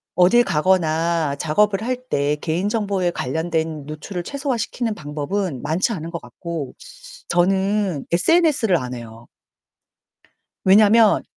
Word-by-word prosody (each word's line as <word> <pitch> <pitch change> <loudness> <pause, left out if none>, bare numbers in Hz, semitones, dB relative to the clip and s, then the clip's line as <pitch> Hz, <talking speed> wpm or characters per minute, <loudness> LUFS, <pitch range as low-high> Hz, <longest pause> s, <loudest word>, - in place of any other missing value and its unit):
어딜 185 +8 +5
가거나 165 -2 +1
작업을 200 +7 +1
할 255 +2 -1
때 145 +1 +1
개인정보에 195 +3 -1
관련된 160 0 -2
노출을 175 +4 -6
최소화시키는 245 - -2
방법은 150 +1 -3
많지 160 +9 0
않은 165 -2 -5
것 170 - -5
같고 145 +3 -6 0.6
저는 190 -2 +1
SNS를 260 - +3
안 125 -3 -5
해요. 115 -1 -10 1.4
왜냐하면 210 +3 +5
175 Hz, 265 characters per minute, -21 LUFS, 155-205 Hz, 1.4 s, 어딜